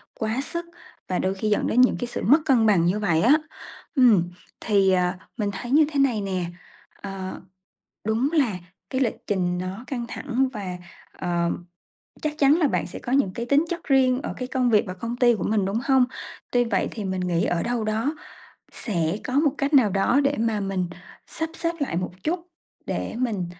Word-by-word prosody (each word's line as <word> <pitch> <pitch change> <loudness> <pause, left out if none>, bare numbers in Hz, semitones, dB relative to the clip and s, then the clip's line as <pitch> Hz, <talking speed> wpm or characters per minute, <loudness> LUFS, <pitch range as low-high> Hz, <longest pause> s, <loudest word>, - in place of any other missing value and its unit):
quá 220 +3 -1
sức 340 0 -4 0.4
và 185 - 0
đôi 190 +1 0
khi 215 +2 -2
dẫn 210 - +1
đến 245 - +4
những 255 - +5
cái 245 - -2
sự 240 - -5
mất 290 +7 +6
cân 250 -5 +4
bằng 195 -6 +4
như 185 +5 +1
vậy 170 -6 +2
á. 250 +9 +6 0.6
Ừm, 220 - +5 0.3
thì, 200 -3 +3
ờ, 180 -1 +2 0.2
mình 210 -3 0
thấy 240 +6 -6
như 300 +2 +6
thế 285 - 0
này 250 -6 +2
nè, 190 -3 -2 0.6
ờ, 195 -1 -6 0.6
đúng 225 +7 +1
là 255 - +2 0.3
cái 260 0 -1
lịch 240 -5 0
trình 180 -3 0
nó 185 +5 -5
căng 245 -2 -3
thẳng 265 0 -1
và, 190 -5 -5 0.4
ờ, 170 -1 -1 0.7
chắc 300 0 -2
chắn 280 -1 +5
là 315 - +4
bạn - - -1
sẽ - - -8
có 245 - -6
những 265 -9 +2
cái 235 - -4
tính 280 +6 +3
chất 345 -1 -4
riêng 260 -3 +3
ở - - -3
cái 250 - -4
công 255 -1 +1
việc 215 -3 +4
và 185 - -4
công 230 +6 -5
ty 240 -1 +4
của - - -4
mình, 210 -3 +1
đúng 200 +4 -1
hông? 265 -2 +4 0.5
Tuy 245 0 +3
vậy 220 -5 0
thì 215 -3 -5
mình 190 -1 -2
nghĩ 175 -2 0
ở 170 -1 0
đâu 240 -1 -1
đó 220 +8 -1 0.6
sẽ 170 -4 -1
có 255 - -4
một 290 +1 +3
cách 280 +2 -1
nào 255 -7 +6
đó 195 +8 +2
để 280 +1 +1
mà 225 -2 +1
mình 195 -2 -1 0.4
sắp 320 0 -4
xếp 335 - 0
lại 275 - -1
một 180 0 -2
chút, 345 +2 -2 0.4
để - - -3
mình 220 -8 -1
225 Hz, 210 wpm, -24 LUFS, 190-265 Hz, 0.7 s, mất